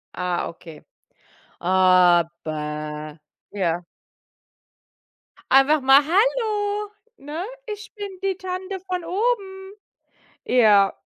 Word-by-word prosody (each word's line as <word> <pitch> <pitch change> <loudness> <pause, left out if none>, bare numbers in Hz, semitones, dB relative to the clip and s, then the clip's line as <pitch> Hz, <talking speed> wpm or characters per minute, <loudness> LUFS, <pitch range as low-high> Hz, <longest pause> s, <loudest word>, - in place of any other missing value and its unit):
Ah, 180 -1 -2
okay. 165 -2 -13 0.8
Aber 165 -4 +1 0.3
ja. 175 -3 -2 1.7
Einfach 275 +2 +5
mal: 270 +2 +7
„Hallo,“ 415 - 0 0.3
ne? 295 +5 -6 0.2
„Ich 425 0 -8
bin 410 -1 -5 0.2
die 385 -1 -1
Tante 375 +1 -5
von 365 -1 -4
oben.“ 385 0 -2 0.7
Ja. 210 -5 +4
280 Hz, 80 wpm, -22 LUFS, -, 1.7 s, mal